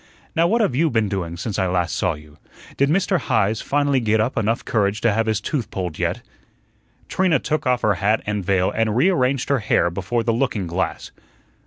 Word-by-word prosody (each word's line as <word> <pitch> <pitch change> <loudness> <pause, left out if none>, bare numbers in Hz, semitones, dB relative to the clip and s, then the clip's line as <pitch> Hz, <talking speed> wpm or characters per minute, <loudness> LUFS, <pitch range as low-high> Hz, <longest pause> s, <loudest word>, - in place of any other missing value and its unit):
Now 165 +1 +3
what 230 +5 +2
have 145 - +1
YOU 160 +4 +2
been 110 -5 0
doing 85 -4 -3
since 105 +3 -3
I 95 - +1
last 90 -1 0
saw 90 -4 0
you? 75 0 -16 0.4
Did 140 +1 +2
Mr. 185 +2 +2
Heise 110 -3 0
finally 145 -1 +1
get 110 -2 +1
up 115 +5 0
enough 115 +1 0
courage 105 -1 0
to 115 -3 +3
have 115 +1 0
his 110 -2 +1
tooth 125 +1 -3
pulled 90 -5 -5
yet?" - - -1 0.8
Trina 185 -5 +2
took 150 +4 -2
off 125 -1 +1
her 105 - +3
hat 105 +3 +2
and 105 -1 -2
veil 95 0 +1
and 110 -1 0
rearranged 135 -3 +2
her 140 -2 +2
hair 105 -5 +1
before 100 +6 -2
the 115 - +1
looking 115 -5 -1
glass. 85 +1 -3
110 Hz, 205 wpm, -21 LUFS, 95-135 Hz, 0.8 s, Now